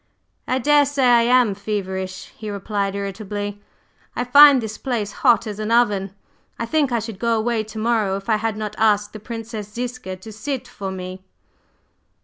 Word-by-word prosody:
"I 255 - +1
daresay 285 +1 +3
I 240 -2 +6 0.2
am 220 -5 0
feverish," 190 -2 -4
he 215 - -7
replied 200 0 -2
irritably, 205 +1 -5 0.5
"I 245 - -1
find 280 +2 +8
this 220 -2 -6
place 230 -6 -2
hot 240 -1 +3
as 210 -1 -6
an 215 0 -3
oven. 205 -5 +2 0.4
I 230 - -2
think 290 +1 +1
I 240 - +2
should 225 -3 -5
go 230 -1 +1
away 225 0 0
to 215 +1 -10
morrow 215 -3 +1
if 195 - -10
I 220 -2 +3
had 220 0 -2
not 210 -1 -4
asked 210 -1 +2
the 215 - -7
Princess 225 -2 -7
Ziska 245 -4 -5
to 185 +4 -11
sit 255 +5 -4
to 195 -1 -6
me." 185 0 -7
215 Hz, 175 wpm, -21 LUFS, 200-240 Hz, 0.5 s, find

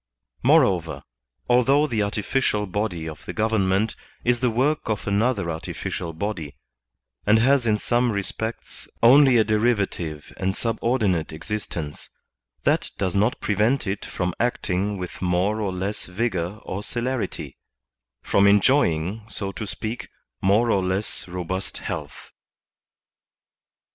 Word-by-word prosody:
Moreover, 95 - +3 0.4
although 130 +4 +4
the 115 -7 -1
artificial 105 +1 0
body 95 -4 -2
of 80 - -8
the - - -4
govern 110 -3 +1
ment 100 +4 +1 0.3
is 120 0 +2
the 125 0 +2
work 130 +4 0
of 105 -2 -1
another 100 -3 +1
artificial 80 +1 -4
body, 80 -4 -4 0.7
and 105 +2 +6
has 125 +1 +3
in 105 -1 +3
some 120 +2 +1
respects 110 +3 -4 0.2
only 130 +1 +7
a 110 - +6
derivative 100 -8 0
and 95 0 -1
subordinate 115 -7 0
exist 90 +5 -5
ence, 75 -3 -6 0.5
that - - +2
does 95 -2 -1
not 105 +5 +2
prevent 110 +6 +1
it 95 0 -3
from 90 -1 -2
acting 105 -4 0
with 90 -1 -7
more 95 +4 +1
or 100 -3 -1
less 95 +3 -3
vigor 90 -1 -2
or 95 - -4
celerity, 125 +3 -3 0.6
from 100 0 +4
enjoying, 100 - +3
so 100 -3 -3
to 105 +2 -6
speak, 110 +3 -5 0.3
more 110 +5 +3
or 95 -3 +2
less 95 +2 -2
robust 90 +1 -4
health. - - -6
105 Hz, 130 wpm, -24 LUFS, 95-115 Hz, 0.7 s, only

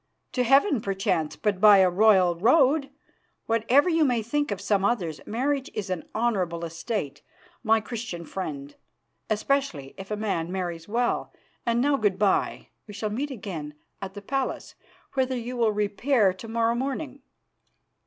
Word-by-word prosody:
To 250 - 0
heaven, 270 - +4
perchance, 190 -6 -1
but 205 -3 -1
by 210 -2 +8
a 190 -1 +6
royal 190 -2 +5
road. 275 - +3 0.6
Whatever 230 +7 +3
you 325 -2 +3
may 245 -5 +1
think 290 +6 -1
of 205 -3 -3
some 200 -2 +1
others, 185 -8 -1
marriage 270 +4 -1
is 195 -2 -3
an 180 -3 -4
honourable 185 -7 0
estate, 165 - -4 0.4
my 220 0 +3
Christian 215 -7 -6
friend, 145 -6 -6 0.6
especially 215 - -1
if 195 - -8
a 210 - -2
man 185 -6 -2
marries 175 -3 -4
well. 240 +3 -1 0.4
And 235 0 +2
now 280 +1 +2
good 205 -6 +1
bye; 200 -1 0 0.2
we 205 - -9
shall 215 0 -3
meet 275 +7 -2
again 175 - -6 0.3
at 195 0 -6
the 205 - -8
palace, 270 +4 -3 0.4
whither 260 -1 0
you 245 +1 -5
will 230 -3 +2
repair 210 +1 +2
to 190 +5 -10
morrow 230 +1 +1
morning. 275 +2 -4
215 Hz, 155 wpm, -26 LUFS, 190-250 Hz, 0.6 s, by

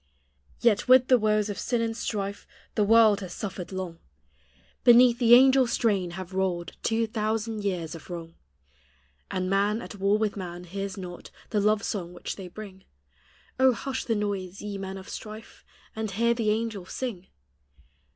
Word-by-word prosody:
Yd 215 -4 +3
with 255 0 +6
(lie - - +9
woes 215 -2 +1
of 205 - -5
sin 240 -2 0
and 225 0 -1
strife 200 -3 -4 0.3
The 210 - +2
world 220 -1 +5
has 185 -3 -7
suffered 195 -3 -6
long; 185 -3 -5 0.8
Beneath 240 -1 +7
the 240 -1 +8
angel 260 0 +6
strain 205 -6 +1
have 185 0 -7
rolled 185 -2 -1
Two 225 0 +1
thousand 220 -1 -2
years' 175 -5 -2
of 165 - -11
wrong; 165 -2 -7 1.0
And 185 0 -2
man, 200 +3 +1
at 235 - -8
war 200 +1 +2
with 215 -1 -1
man, 180 -3 -6
hears 195 +2 -5
not 180 -2 -8 0.2
The 210 - +2
love 210 0 +2
song 180 -4 -3
which 175 - -6
they 190 -2 -8
bring: 190 0 -10 0.8
O, 260 -1 +6
hush 270 +2 -4
the 225 - 0
noise, 200 -3 -3
ye 205 -1 -5
men 190 0 -5
of 190 - -10
strife, 215 +1 -9 0.3
And 220 -1 -3
hear 235 +5 +2
the 230 -2 0
angels 215 -4 -2
sing 215 -8 -5
205 Hz, 170 wpm, -27 LUFS, 190-225 Hz, 1.0 s, lie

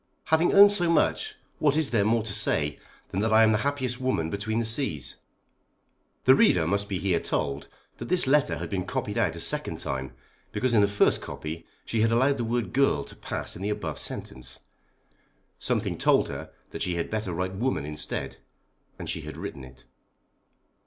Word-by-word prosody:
Having 160 +2 +4
owned 200 +1 +9
so 175 -4 +2
much, 430 - +1 0.2
what 145 0 +3
is 160 -3 +1
there 110 -4 +3
more 110 +2 +2
to 105 -2 -4
say 80 -8 +1 0.3
than 95 - -2
that 110 +2 +1
I 110 +1 +7
am 110 - +5
the 105 - +2
happiest 130 -1 -1
woman 80 -12 0
between 105 +2 -2
the 115 - 0
seas? 110 - -1 1.1
The 130 - +8
reader 90 -10 +4
must 100 +4 -1
be 95 - -1
here 90 -2 +1
told 70 -3 -2 0.3
that - - -7
this 180 -2 +3
letter 145 +2 +3
had - - -4
been 95 -3 -3
copied 105 +2 -2
out 90 -8 +1
a - - -7
second - - 0
time 65 0 -4 0.4
because 130 -2 0
in 110 - +5
the 100 - +4
first 100 0 +2
copy 80 +2 -7 0.2
she 115 - 0
had 115 +1 +3
allowed 130 +4 +3
the - - 0
word 120 0 -2
girl 135 - +2
to - - -12
pass - - -4
in 90 - -9
the 100 - -1
above 90 -8 -3
sentence. 65 -1 -6 1.0
Something - - -1
told - - +3
her - - -7 0.2
that - - -6
she 90 - -1
had 85 - -3
better 110 -3 -2
write 90 +2 -2
woman 115 - -1
instead, 75 0 -4 0.6
and - - -7
she - - -3
had - - -8
written 70 - -6
it. 65 -1 -14
110 Hz, 195 wpm, -27 LUFS, 85-130 Hz, 1.1 s, owned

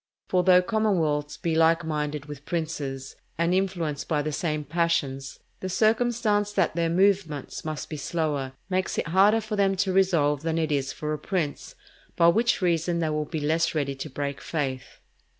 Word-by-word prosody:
For 185 - +3
though 180 0 +6
commonwealths 165 -9 0
be 165 - -1
like 165 +1 +3
minded 150 -2 -2
with 145 -1 -9
princes, 150 -5 -4 0.2
and 170 +2 +1
influenced 175 -6 -1
by 150 -3 0
the 155 - -2
same 150 0 -2
passions, 145 -4 -1 0.2
the 185 - -4
circumstance 220 0 +2
that 185 -5 +1
their 170 -1 +1
movements 180 -5 +1
must 155 -1 -4
be 155 - -6
slower, 145 -3 -2
makes 185 0 -1
it - - -1
harder 200 +6 +4
for 215 0 -4
them 195 -1 +2
to 190 0 0
resolve 165 -7 +2
than 165 0 -1
it 160 -1 0
is 140 -2 0
for 150 0 -4
a 150 - -4
prince, 155 -3 -3 0.4
for 170 0 +6
which 225 0 +1
reason 170 0 +1
they 165 -2 0
will 150 0 -1
be 155 0 -4
less 160 +3 +1
ready 140 -2 0
to 135 +3 -7
break 140 0 -4
faith. 135 -5 -4
165 Hz, 180 wpm, -26 LUFS, 150-185 Hz, 0.4 s, though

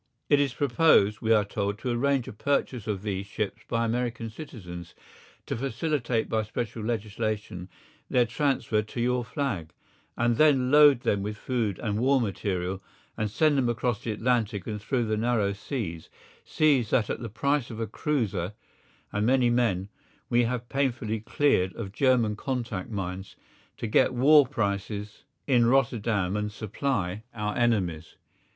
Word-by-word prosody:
It 145 - +5
is 140 -3 0
proposed, 120 -6 +3
we 115 - 0
are 105 -2 +5
told, 100 0 -2
to 125 +3 -3
arrange 135 +1 +1
a - - -7
purchase 125 -1 -1
of 100 -2 -2
these 100 -2 -3
ships 100 0 -4
by 115 -1 0
American 115 -1 -2
citizens, 90 - -9 0.5
to - - -3
facilitate 125 -2 -1
by 110 - 0
special 110 +1 -4
legislation 105 -4 -3 0.4
their 125 -1 +3
transfer 115 -3 0
to 105 +3 -8
your 125 +1 +1
flag, 120 - -3 0.4
and 120 -1 +2
then 155 -2 +6
to 130 - 0
load 145 -1 +6
them 100 -4 +1
with 105 +2 -4
food 110 -6 -1
and 105 -2 -2
war 135 +3 +3
material 95 -4 -2 0.3
and 110 -1 -1
send 145 +6 +2
them 125 -2 +1
across 120 -1 -1
the 115 - -2
Atlantic 110 -3 0
and 105 -1 -4
through 120 +2 0
the 110 0 -1
narrow 110 -3 +1
seas, 100 - -5 0.3
seas 140 -7 +2
that 110 -4 +1
at - - -3
the 115 -1 -5
price 140 +4 0
of 115 - -7
a 115 - -1
cruiser 110 - -2 0.6
and 105 - 0
many 125 -2 +4
men 110 -6 +1 0.4
we 120 0 +4
have 120 0 -3
painfully 120 -5 -1
cleared 110 -6 +1
of 100 -4 -6
German 120 -2 +2
contact 120 -6 -3
mines, 95 -2 -5 0.4
to - - -4
get 120 +3 +3
war 145 +2 +6
prices 105 -3 -3 0.2
in 120 -4 +4
Rotterdam 115 -7 +1
and 105 0 -2
supply 110 -3 -2
our 105 -1 -2
enemies. 95 -10 0
115 Hz, 160 wpm, -27 LUFS, 105-125 Hz, 0.6 s, then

